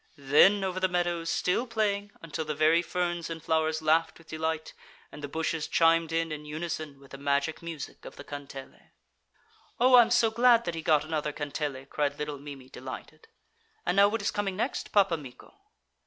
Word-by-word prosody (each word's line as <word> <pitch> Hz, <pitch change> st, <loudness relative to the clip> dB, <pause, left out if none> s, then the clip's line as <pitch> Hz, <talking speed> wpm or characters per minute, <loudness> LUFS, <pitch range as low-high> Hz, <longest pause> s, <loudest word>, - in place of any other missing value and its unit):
Then 150 Hz, +9 st, +5 dB
over 185 Hz, -1 st, -2 dB
the 185 Hz, -, +2 dB
meadows, 175 Hz, -2 st, -1 dB
still 230 Hz, +8 st, 0 dB
playing, 205 Hz, -3 st, -1 dB
until 160 Hz, -1 st, -4 dB
the 150 Hz, -1 st, -4 dB
very 155 Hz, +3 st, +4 dB
ferns 175 Hz, -1 st, -2 dB
and 165 Hz, -1 st, -5 dB
flowers 160 Hz, 0 st, 0 dB
laughed 160 Hz, +1 st, +2 dB
with 165 Hz, -, -19 dB
delight 160 Hz, 0 st, -3 dB, 0.4 s
and -, -, -10 dB
the -, -, -3 dB
bushes 160 Hz, +1 st, -2 dB
chimed 165 Hz, 0 st, +3 dB
in 165 Hz, 0 st, 0 dB
in 150 Hz, 0 st, -5 dB
unison 155 Hz, -2 st, -5 dB
with 135 Hz, -1 st, -18 dB
the 140 Hz, -, -9 dB
magic 140 Hz, +2 st, 0 dB
music 165 Hz, -3 st, -7 dB
of -, -, -10 dB
the -, -, -10 dB
kantele. 140 Hz, -2 st, -10 dB, 0.9 s
'Oh! 250 Hz, +1 st, +7 dB
I'm 235 Hz, -1 st, +7 dB
so 235 Hz, -2 st, +3 dB
glad 235 Hz, 0 st, +4 dB
that 170 Hz, -, -2 dB
he 165 Hz, -, -4 dB
got 155 Hz, -1 st, +3 dB
another 155 Hz, -1 st, -2 dB
kantele,' 145 Hz, -2 st, -4 dB
cried 145 Hz, -1 st, -1 dB
little 150 Hz, -1 st, -4 dB
Mimi, 140 Hz, -2 st, -10 dB
delighted. 130 Hz, +4 st, -9 dB, 0.6 s
'And -, -, +1 dB
now 200 Hz, +1 st, +7 dB
what 215 Hz, 0 st, -2 dB
is -, -, +1 dB
coming 200 Hz, -2 st, -2 dB
next, 235 Hz, +7 st, -3 dB
Pappa 195 Hz, -5 st, +3 dB
Mikko?' 130 Hz, -4 st, -12 dB
160 Hz, 185 wpm, -28 LUFS, 150-180 Hz, 0.9 s, Oh